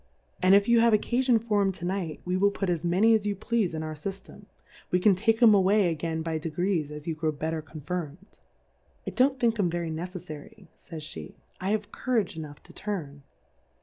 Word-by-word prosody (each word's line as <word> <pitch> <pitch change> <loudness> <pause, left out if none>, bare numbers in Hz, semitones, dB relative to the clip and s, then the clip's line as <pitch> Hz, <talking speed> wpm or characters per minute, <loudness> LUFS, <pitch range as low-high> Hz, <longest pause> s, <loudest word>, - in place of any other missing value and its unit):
And 185 +2 +6
if 200 0 +4
you 235 -1 +5
have 230 0 +5
occaiion 235 +1 +2
tor 210 -2 +3
'em 195 -1 +2
to 175 - -7
Night, 180 -4 -3
we 180 +1 -1
will 200 +2 +4
put 195 -2 -2
as 170 -2 -2
many 190 +7 +4
as 210 -2 +2
you 205 - 0
pleafe 210 -3 -1
in 160 - -3
our 155 0 -4
Sy 155 +6 -4
ftem, 195 +1 -11 0.4
we 180 - +2
can 200 +2 +5
take 225 +5 +2
'em 220 -2 +8
away 195 -1 +4
again 160 0 -3
by 160 -1 -2
De 165 - -4
grees 170 -1 -1
as 150 0 -8
you 165 - -1
grow 155 0 -1
better 160 +2 -3
confirmed. 160 +3 -7 0.7
I - - -3
don't 265 +1 +2
think 230 -3 +1
'em 180 -4 +2
very 170 -1 -3
neceflary, 180 +3 -8
fays 160 -3 -9
/7;^, 155 - -8 0.3
I 185 - -2
have 210 0 -1
Courage 230 -10 -1
enough 150 -2 -8
to 170 - -15
turn. 165 -9 -5
185 Hz, 215 wpm, -27 LUFS, 160-210 Hz, 0.7 s, em